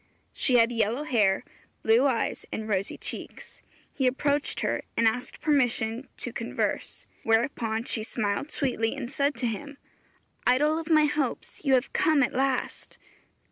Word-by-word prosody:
She 255 - +1
had 230 0 +5
yellow 230 +4 0
hair, 210 -9 +2 0.4
blue 230 +5 +5
eyes 245 -4 -1
and 220 0 -4
rosy 195 -2 -1
cheeks. - - -6 0.3
He 265 -3 +1
approached 285 +3 0
her, - - 0 0.2
and 230 - +4
asked 245 +3 -2
permission 250 -5 +1
to - - -4
converse; - - -3 0.2
whereupon 225 -1 +1
she 230 - -2
smiled 215 +4 -2
sweetly 245 -6 -1
and 255 -3 -5
said 280 0 +1
to 245 - -2
him, 280 +5 -4 0.7
'Idol 295 +5 +3
of 325 0 -7
my 310 -2 +6
hopes, 290 -2 -2
you 270 -3 +4
have 250 - 0
come 315 -6 +3
at 245 - -1
last!' 265 -1 -1
250 Hz, 150 wpm, -27 LUFS, 225-285 Hz, 0.7 s, my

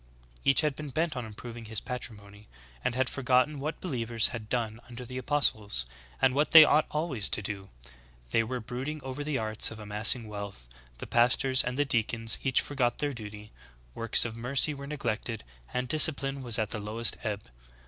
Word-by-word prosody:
Each 135 +2 +4
had 150 -3 0
been 150 -1 -7
bent 155 +3 -1
on 125 -3 -4
improving 115 +2 -9
his 110 -1 -2
patri 125 0 -5
mony; 105 +1 -16 0.4
and 120 - -1
had 130 0 +1
forgotten 130 +2 +1
v/hat 150 +3 -4
believers 120 -9 0
had 110 -3 -7
done 115 -3 -2
under 125 +1 -8
the 130 +2 -6
apostles, 110 - +1 0.3
and 130 -1 +3
what 145 +3 +2
they 160 -1 +12
ought 155 0 +3
always 150 -9 +1
to 105 - -1
do: 100 -2 -5 0.3
— - - -28
they - - +3
were 125 +3 -4
brooding 130 +6 -5
over 130 +2 -5
the 145 -2 -1
arts 110 -2 -1
of 110 - -9
amassing 110 +2 +2
wealth: 100 - -7 0.2
— - - -26
the - - -7
pastors 125 +2 +4
and 125 +1 -3
the 145 - +2
deacons 115 -2 +1
each 130 -2 +2
forgot 125 -4 -1
their 145 -1 -2
duty: 105 -2 -9 0.4
Works 115 - +2
of 115 -1 -4
mercy 135 +6 +2
were 140 0 -8
neglected, 120 -5 -3 0.3
and 125 0 -2
discipline 140 -2 +3
was 120 -4 0
at 110 -1 -1
the 110 - -2
lowest 110 +3 +1
ebb. 105 -3 -3
120 Hz, 195 wpm, -29 LUFS, 110-135 Hz, 0.4 s, they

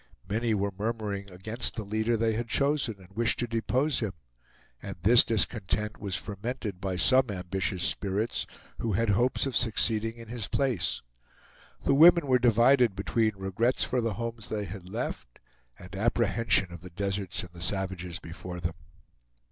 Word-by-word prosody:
Many 110 +2 0
were 100 -1 -1
murmuring 105 -2 -3
against 110 +6 -3
the 110 - -4
leader 110 +3 0
they 110 0 +1
had 115 +2 -3
chosen, 140 -1 +1
and 95 0 -18
wished 115 0 +2
to 120 - 0
depose 125 +5 0
him; 110 -5 -2 0.7
and - - -6
this 115 +5 +7
discontent 105 -1 0
was 100 -3 -2
fermented 105 +1 -5
by 95 -1 -2
some 130 +6 +4
ambitious 95 -1 -2
spirits, 100 +5 0 0.3
who 115 -3 -1
had 115 +3 +1
hopes 120 +8 +2
of 135 -3 -3
succeeding 115 -1 +2
in 115 -1 -11
his 115 -3 -4
place. 120 - 0 0.8
The - - +4
women 170 +2 +7
were 130 -2 +3
divided 120 -1 +4
between 110 +3 0
regrets 95 +6 0
for 125 - 0
the 115 -2 -1
homes 115 0 -5
they 105 -1 -2
had 90 -1 -9
left - - -5 0.4
and 90 +1 -11
apprehension 110 -3 +2
of 85 - -9
the 90 - -10
deserts 95 0 -2
and 90 -1 -12
the 85 - -11
savages 95 -2 -1
before 90 +1 -8
them. 85 -1 -3
110 Hz, 165 wpm, -28 LUFS, 95-120 Hz, 0.8 s, this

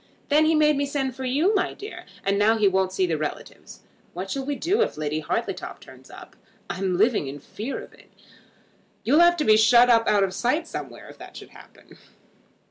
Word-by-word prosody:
Then 305 +2 +4
he 320 +1 +3
made 300 -1 +3
me 285 0 -1
send 270 -3 -3
for 265 0 -6
you, 295 +11 +1
my 390 - -1
dear; 415 +2 -10 0.2
and 200 +1 +1
now 220 +2 +3
he 210 -2 +3
won't 190 -1 +1
see 190 0 0
the 165 -3 -2
relatives. 155 -1 -7 0.3
What 185 +2 -5
shall 275 - -3
we 285 +1 -3
do 390 +10 0
if - - -1
Lady 155 0 -2
Hartletop 155 - -4
turns - - -16
up? - - -13 0.4
I'm 185 -1 -2
living 215 - +2
in 140 +2 -7
fear 225 - -6
of - - -12
it. - - -21 0.9
You'll 285 +7 +3
have 345 0 +5
to 305 - -1
be 215 0 +5
shut 235 +3 +5
up 230 -1 +3
out 205 -1 +3
of 190 -1 -2
sight 275 - -1
somewhere - - -8
if - - -14
that - - -11
should - - -12
happen." - - -18
235 Hz, 210 wpm, -24 LUFS, 190-295 Hz, 0.9 s, have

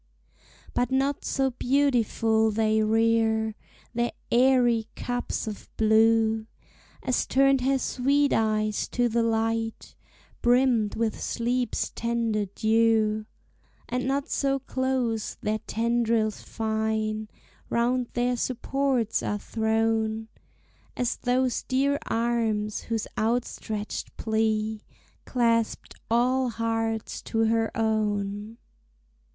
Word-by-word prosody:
But 245 - +1
not 270 +2 0
so 270 -1 0
beautiful 235 -4 +2
they 220 0 +2
rear 220 0 +2 0.4
Their 240 0 0 0.2
airy 240 -3 +4
cups 245 0 -3
of 215 -2 -7
blue, 220 0 +3 0.6
As 255 - 0
turned 275 0 +4
her 270 +2 +2
sweet 280 +2 +1
eyes 215 -1 +1
to 245 0 +2
the 235 0 +1
light, 225 0 -1 0.5
Brimmed 240 -3 +3
with 225 -1 -1
sleep's 245 0 -1
tender 230 -3 -1
dew; 220 +1 +2 0.6
And 250 +1 -2
not 275 +1 0
so 275 -1 0
close 260 -4 -1
their 215 +1 -1
tendrils 230 -1 0
fine 220 -1 -2 0.4
Round 245 +1 +1
their 245 0 0
supports 255 -1 0
are 210 - -1
thrown, 220 0 0 0.7
As 245 -1 0
those 250 0 +1
dear 280 +2 +1
arms 225 -3 0
whose 225 -2 -2
outstretched 220 -2 -2
plea 220 -1 0 0.4
Clasped 230 -2 0 0.2
all 250 +2 +2
hearts 225 -1 -2
to 225 0 0
her 225 0 +2
own. 210 -1 -1
225 Hz, 100 wpm, -26 LUFS, 220-245 Hz, 0.7 s, airy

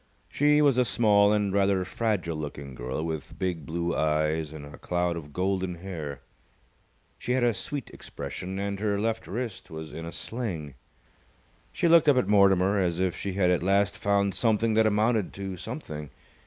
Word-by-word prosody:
She 150 +1 +3
was 135 -4 +4
a - - +5
small 105 -4 +4
and 105 -2 +1
rather 100 -2 +2
fragile 100 -6 -1
looking 70 -3 -6
girl, 65 +4 -4
with 80 -3 -5
big 85 -6 -3
blue 85 +1 -1
eyes 75 0 0
and 75 -2 -8
a 75 - -12
cloud 90 -1 -1
of 75 -3 -8
golden 95 +1 -1
hair. 80 -7 -6 1.0
She 125 - -1
had 130 -1 +1
a 120 -1 +3
sweet 135 +6 -5
expression, 90 +7 -7
and 100 0 -3
her 100 -1 0
left 110 +1 -1
wrist 115 -4 -5
was 80 -1 -8
in 80 0 -6
a - - -6
sling. 90 - -5 1.0
She - - +1
looked 165 -2 +6
up 140 - +5
at 125 - +2
Mortimer 100 -1 +4
as 90 -2 0
if 95 -2 0
she 100 - -4
had 90 -2 +2
at 90 - +2
last 100 +3 +2
found 100 -3 +1
something 110 +2 +2
that 110 0 +4
amounted 110 0 +1
to 95 -1 -5
something. 85 - -7
95 Hz, 180 wpm, -27 LUFS, 85-110 Hz, 1.0 s, looked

